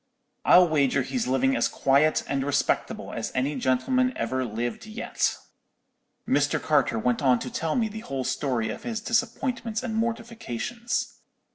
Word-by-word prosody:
I'll 180 0 +7
wager 145 -5 +2
he's 250 -3 -2
living 135 +1 +2
as - - +2
quiet 140 +3 +2
and 135 -1 -1
respectable 145 0 -1
as - - -3
any 135 +4 0
gentleman 255 - +1
ever 130 +3 -1
lived 120 - -4
yet.' 220 +3 -1 0.9
"Mr. 145 +1 +2
Carter 145 -6 +2
went 120 +1 0
on 130 -3 +4
to 125 +1 -6
tell 160 -1 -1
me 230 -3 +2
the 220 +1 -7
whole 135 - -4
story 130 -3 -1
of - - -5
his 230 -2 -3
disappointments 230 0 -1
and 240 -3 -3
mortifications. 230 - -3
145 Hz, 150 wpm, -26 LUFS, -, 0.9 s, I'll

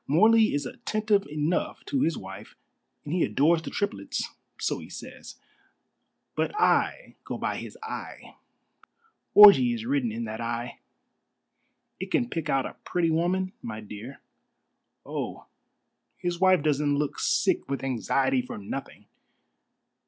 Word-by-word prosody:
Morley 215 +6 +5
is 145 - -1
attentive 215 - 0
enough 150 +3 -2
to 275 -2 -1
his 165 -3 +1
wife, 95 +2 -10 0.5
and 150 - -4
he 180 - +2
adores 160 +4 +3
the - - -6
triplets 205 -1 -3 0.3
so - - -1
he - - -11
says; - - -10 1.0
but 425 - -1
I - - +1
go - - -5
by - - -2
his - - -8
eye. 445 - -7 1.0
Orgy 150 -13 +9
is 115 -1 -6
written 130 -2 0
in 115 +2 -4
that 110 0 -5
eye. 120 +1 -4 1.2
It 190 - -5
can 240 +3 0
pick 165 -3 -3
out 135 -1 +2
a - - -8
pretty 170 -2 0
woman, 185 +3 0
my 110 -1 -6
dear. 105 +5 -9 0.9
Oh, - - -5 0.7
his 175 -2 -3
wife 185 -4 +4
doesn't 145 -1 +2
look 145 0 -2
sick - - +1
with 140 -1 -3
anxiety 130 +1 +1
for 125 - -8
nothing!" 100 -1 -7
150 Hz, 135 wpm, -27 LUFS, 125-185 Hz, 1.2 s, Orgy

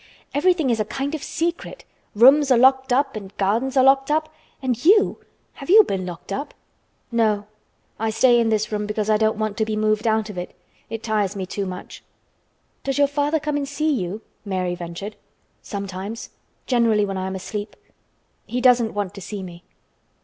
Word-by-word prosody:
Everything 320 -2 +2
is 225 - 0
a 215 - +1
kind 275 +6 -3
of 310 - -3
secret. 340 +11 -3 0.3
Rooms 275 +6 +6
are 255 - +5
locked 265 +1 +4
up 275 0 +2
and 200 -2 -8
gardens 230 +8 0
are 260 - +6
locked 270 +1 +4
up—and 300 -5 -3
you! 400 +5 +4 0.3
Have 275 - -11
you 430 +4 +9
been 190 - -3
locked 175 +2 -7
up?" 280 +6 -5 0.6
"No. 215 -3 +1 0.5
I 225 0 0
stay 240 +2 +4
in 230 -1 +2
this 215 0 0
room 210 -1 -2
because 215 0 -1
I 215 - +4
don't 220 0 +1
want 215 -1 -2
to 220 - +2
be 215 0 -2
moved 215 +1 +1
out 220 -1 +1
of 180 - -6
it. 180 - -7 0.3
It 225 0 -6
tires 210 -3 0
me 190 -2 -3
too 195 +1 -4
much." 180 -1 -8 0.8
"Does 275 0 -2
your 285 - +5
father 290 +2 0
come 300 -1 -2
and 280 -1 -3
see 305 +2 0
you?" 200 -3 -3 0.2
Mary 185 -3 -2
ventured. 175 +4 -7 0.4
"Sometimes. 200 +2 -6 0.3
Generally 230 -4 +3
when 195 -1 -4
I 185 - -3
am 190 - -4
asleep. 205 +3 -6 0.7
He 245 - -2
doesn't 245 -3 +4
want 205 -2 -2
to 200 - -9
see 200 +1 -6
me." 175 -1 -10
220 Hz, 185 wpm, -22 LUFS, 205-270 Hz, 0.8 s, you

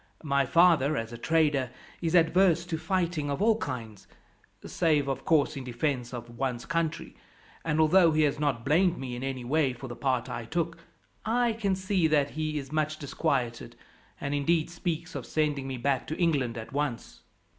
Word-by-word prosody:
My 140 -3 +1
father, 160 -4 +4
as 115 +1 -4
a - - -6
trader, 150 -4 +2 0.3
is 165 0 0
adverse 170 0 +4
to 165 -3 -3
fighting 170 -5 -1
of 140 - -2
all 220 +1 +3
kinds 115 - -6 0.6
save, 155 -5 +1
of 135 -1 -3
course, 155 -1 +3
in 135 - -5
defence 125 0 -2
of 120 -1 -8
one's 125 -3 -2
country; 165 +1 -2 0.5
and 155 -1 0
although 165 +2 +5
he 155 0 +3
has 145 -1 +1
not 135 -6 -1
blamed 175 +5 +3
me 130 -2 -5
in 120 - -6
any 130 -2 -4
way 140 0 +1
for 125 +2 -9
the 120 - -7
part 130 -2 0
I 120 -2 -5
took, 165 +4 -2 0.4
I 235 +1 +1
can 200 -4 0
see 185 -2 +1
that 145 -2 +2
he 155 0 -2
is 135 -1 -6
much 155 0 0
disquieted, 130 -4 -2 0.4
and 140 - -3
indeed 155 +3 +1
speaks 170 -2 -3
of - - -4
sending 150 -3 -1
me 130 -1 -4
back 130 +1 0
to 155 - -4
England 140 -10 +1
at 110 +3 -8
once." 140 -4 -3
150 Hz, 185 wpm, -28 LUFS, 130-165 Hz, 0.6 s, although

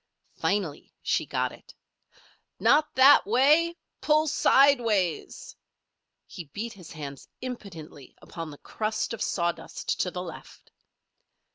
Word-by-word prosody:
Finally 185 -8 -2
she - - 0
got - - -1
it: - - -16 0.8
"Not 300 +1 +3
that 270 +2 +7
way! 300 +9 +3 0.2
Pull 305 0 +3
sideways!" 240 - +2 0.7
He 175 - -9
beat 215 +11 -6
his 180 -5 -13
hands 140 -4 -8
impotently 180 - -9
upon 165 -2 -8
the 145 - -11
crust 215 +6 -3
of 230 - -7
sawdust 170 -2 -2
to 180 - +1
the 180 0 -5
left. 170 -3 -11
210 Hz, 115 wpm, -27 LUFS, 170-265 Hz, 0.8 s, that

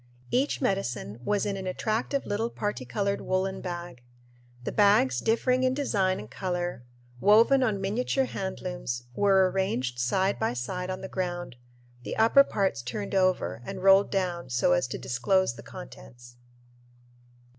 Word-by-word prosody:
Each 275 +4 +1
medicine 125 - -2
was 205 +8 0
in 200 -1 -1
an 190 -1 -5
attractive 220 +8 -1
little 220 +3 -1
particolored 200 - -2
woolen 190 +1 -1
bag. 175 -7 -6 0.6
The - - -3
bags, 200 -12 +4
differing 250 +3 +1
in 260 0 +2
design 195 -9 +1
and 105 - -8
color, 175 - -3 0.4
woven 230 - +5
on 220 -6 +1
miniature 240 +7 0
hand 190 -6 -5
looms, 175 -10 -4
were 190 +2 +4
arranged 130 -11 -1
side 190 +11 +1
by 220 - 0
side 180 +10 -4
on 185 0 -4
the 190 - -5
ground, 175 -7 -4 0.5
the - - -5
upper 230 +5 +6
parts 195 - -1
turned 200 - -5
over 185 -11 +1
and 190 +5 -7
rolled 195 +1 +6
down 180 -6 -2
so 120 -7 +2
as 90 +8 +1
to 130 - -5
disclose 160 +7 +1
the 120 - -11
contents. 120 - -12
190 Hz, 150 wpm, -27 LUFS, 130-205 Hz, 0.6 s, upper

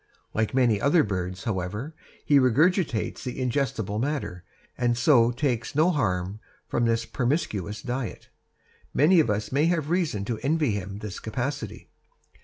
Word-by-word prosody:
Like 110 +3 0
many 120 -6 +3
other 150 +3 +4
birds, 90 -3 -3
however, 105 - -3 0.3
he 145 -2 +5
regurgitates 135 - +2
the 125 0 -5
indigestible 120 -5 -1
matter, 110 - -3 0.3
and 120 -1 +1
so 120 -2 +5
takes 125 -1 -2
no 160 +5 +4
harm 100 - -1 0.3
from 120 - 0
this 115 0 +1
promiscuous 115 - -2
diet. 125 -1 -4 0.7
Many 165 +5 +5
of 135 - +3
us 105 0 -1
may 140 +4 +3
have 165 -3 0
reason 160 - 0
to 115 -1 -3
envy 150 -1 +1
him 100 -1 -4
this 105 -3 -6
capacity. 130 +6 -4
120 Hz, 145 wpm, -26 LUFS, 105-145 Hz, 0.7 s, he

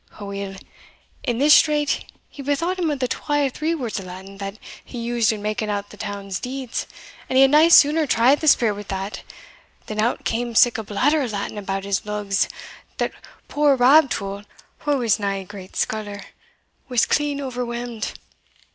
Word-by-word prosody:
Aweel, 200 -1 -5 0.7
in 240 -2 -1
this 295 +4 +6
strait, 295 -2 +3 0.2
he 285 - -11
bethought 330 +7 -1
him 340 -3 +1
of 295 - -1
the 255 -1 -1
twa 290 +3 0
or - - +1
three 315 +5 -1
words 240 -8 -3
o' - - -8
Latin 190 +2 -10
that 195 +1 -5 0.3
he - - -10
used 235 -1 +1
in 210 -2 -5
making 215 0 -2
out 205 0 -3
the - - -11
town's 200 -2 -5
deeds, 255 -1 -4 0.4
and 260 - -2
he 270 - +8
had 270 - +5
nae 305 +2 +7
sooner 310 -1 +6
tried 245 +4 +4
the 310 - -2
spirit 235 -7 +5
wi' - - -5
that, 195 +1 -4 0.6
than 215 0 -2
out 235 +3 -1
cam 235 0 -2
sic 240 -1 +5
a - - -4
blatter 280 +9 +1
o' 265 - -1
Latin 210 -1 -4
about 195 -1 -3
his 200 -1 -1
lugs, 210 -1 -1 0.5
that - - -1 0.4
poor 290 -1 +3
Rab 270 +4 +6
Tull, 200 -1 -4 0.5
wha 290 - +3
was 235 -7 +1
nae 195 -1 -2
great 190 0 -11
scholar, 205 -2 -2 0.7
was 245 -2 +3
clean 290 -1 0
overwhelmed. 245 -3 -4
235 Hz, 180 wpm, -22 LUFS, 205-280 Hz, 0.7 s, he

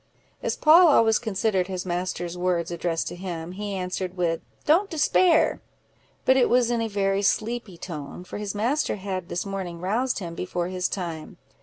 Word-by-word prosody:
As - - -1
Poll 335 +3 +7
always 225 -7 +5
considered 205 -4 0
his 185 -1 -4
master's 175 -1 -3
words 180 -1 0
addressed 170 -1 -2
to - - -7
him, 175 -2 -5
he 200 +1 -4
answered 185 0 -3
with, 170 -2 0 0.2
"Don't 355 +7 +4
despair;" 330 +2 +3 0.6
but 260 - +5
it 260 - +4
was 245 -1 +3
in 235 -1 +1
a 225 - 0
very 200 -1 0
sleepy 215 -1 -1
tone, 165 0 -7
for 185 - -7
his 210 -1 -4
master 240 +9 0
had 190 -2 -5
this 175 - -2
morning 190 -4 -5
roused 225 +8 0
him 175 -5 -5
before 175 0 -3
his 185 -1 -1
time. 170 -5 -5
190 Hz, 175 wpm, -25 LUFS, 175-225 Hz, 0.6 s, Poll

